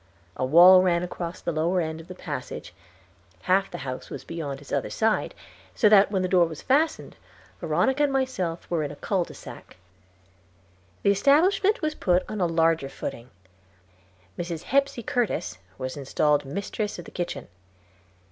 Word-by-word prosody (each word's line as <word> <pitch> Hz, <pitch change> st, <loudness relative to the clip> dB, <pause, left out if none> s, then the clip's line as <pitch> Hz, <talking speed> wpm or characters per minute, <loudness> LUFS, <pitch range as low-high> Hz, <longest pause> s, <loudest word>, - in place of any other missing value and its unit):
A -, -, -3 dB
wall 175 Hz, +7 st, +8 dB
ran 175 Hz, -1 st, +2 dB
across 175 Hz, -1 st, -6 dB
the -, -, -2 dB
lower 170 Hz, +3 st, 0 dB
end 160 Hz, -1 st, -3 dB
of 165 Hz, -, -16 dB
the 185 Hz, -, -9 dB
passage; -, -, -7 dB, 0.7 s
half 195 Hz, +2 st, +2 dB
the -, -, -7 dB
house 130 Hz, -1 st, -6 dB
was -, -, -7 dB
beyond 145 Hz, -5 st, -5 dB
its 145 Hz, -, -14 dB
other -, -, -1 dB
side, 220 Hz, -1 st, 0 dB, 0.4 s
so 220 Hz, -, +4 dB
that 205 Hz, -1 st, +6 dB
when 190 Hz, -2 st, 0 dB
the -, -, +1 dB
door 180 Hz, -2 st, +4 dB
was 160 Hz, -2 st, -9 dB
fastened, 300 Hz, +5 st, 0 dB, 0.4 s
Veronica 265 Hz, +2 st, +1 dB
and 290 Hz, -1 st, +3 dB
myself 255 Hz, -11 st, -2 dB
were 170 Hz, -2 st, -1 dB
in 145 Hz, -, -2 dB
a 145 Hz, -, -8 dB
cul 190 Hz, +4 st, -1 dB
de -, -, -12 dB
sac. -, -, -12 dB, 1.3 s
The 200 Hz, -, +5 dB
establishment 345 Hz, -, +3 dB
was 310 Hz, 0 st, 0 dB
put 180 Hz, -9 st, +1 dB
on 215 Hz, -2 st, -4 dB
a 175 Hz, -, +3 dB
larger 165 Hz, -3 st, +1 dB
footing. 120 Hz, -2 st, -7 dB, 1.1 s
Mrs. 170 Hz, -1 st, -4 dB
Hepsey 275 Hz, -2 st, 0 dB
Curtis 205 Hz, -, -2 dB, 0.2 s
was 130 Hz, 0 st, -5 dB
installed 145 Hz, +1 st, +1 dB
mistress 200 Hz, +7 st, -4 dB
of 175 Hz, -, -9 dB
the -, -, -11 dB
kitchen. 170 Hz, -6 st, -5 dB
180 Hz, 165 wpm, -25 LUFS, 160-215 Hz, 1.3 s, wall